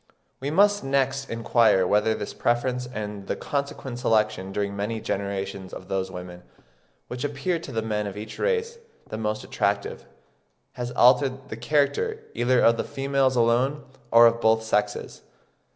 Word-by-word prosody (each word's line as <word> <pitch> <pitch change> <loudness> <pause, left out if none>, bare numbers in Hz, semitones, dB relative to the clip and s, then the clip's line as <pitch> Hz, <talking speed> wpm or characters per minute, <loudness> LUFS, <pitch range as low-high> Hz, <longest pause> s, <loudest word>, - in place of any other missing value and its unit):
We 135 - -3
must 205 +5 +3
next 135 0 0
inquire 115 -4 +3
whether 105 +3 +2
this 105 - -5
preference 125 +1 0
and 105 -5 -6
the - - -1
consequent 140 -3 -4
selection 110 -5 +1
during 100 0 -2
many 105 +3 -2
generations 100 -2 -4
of 95 - -10
those 95 -1 -1
women, 90 -1 -8 0.7
which 125 0 -5
appear 145 +5 -1
to 160 - -9
the 110 -2 -2
men 105 -2 -2
of 100 - -7
each 110 +1 -8
race 465 -1 -1 0.3
the 110 - -5
most 110 -1 -2
attractive, - - -2 0.6
has 120 -1 -5
altered 130 +2 +3
the - - -5
character 150 - 0
either 125 +1 +2
of 115 0 +5
the - - -1
females 135 -1 0
alone, 125 +5 +2 0.3
or 115 0 +8
of 115 0 +3
both 110 0 +3
sexes. 110 -1 -1
120 Hz, 155 wpm, -25 LUFS, 105-135 Hz, 0.7 s, or